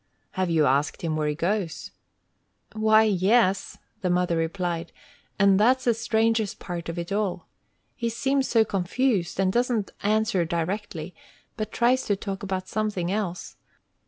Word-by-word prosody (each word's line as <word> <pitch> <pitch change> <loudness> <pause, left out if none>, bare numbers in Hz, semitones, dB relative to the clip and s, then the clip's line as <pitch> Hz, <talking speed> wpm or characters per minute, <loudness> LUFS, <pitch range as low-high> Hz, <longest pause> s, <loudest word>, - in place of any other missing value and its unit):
"Have 185 -2 -1
you 160 -2 +3
asked 140 +5 +1
him 160 -2 -1
where 155 -1 0
he 150 - -1
goes?" 170 -2 -2 0.8
"Why, 220 0 +4
yes," 195 0 +2 0.2
the 185 - 0
mother 180 -1 +1
replied; 170 0 -2 0.5
"and 195 -1 +4
that's 255 +4 +4
the 240 - +3
strangest 225 -1 0
part 170 -2 -6
of 165 - -5
it 170 +2 -5
all! 195 -4 -1 0.5
He 235 -1 -2
seems 270 +3 0
so 225 -2 +3
confused, 195 0 0
and 190 -1 +2
doesn't 240 -4 0
answer 215 -2 +1
directly, 170 0 -3 0.4
but 215 -1 -4
tries 250 +2 +2
to 205 - +1
talk 195 -1 -5
about 190 -2 -3
something 210 -5 -2
else. 195 -4 -3
195 Hz, 150 wpm, -25 LUFS, 175-220 Hz, 0.8 s, Why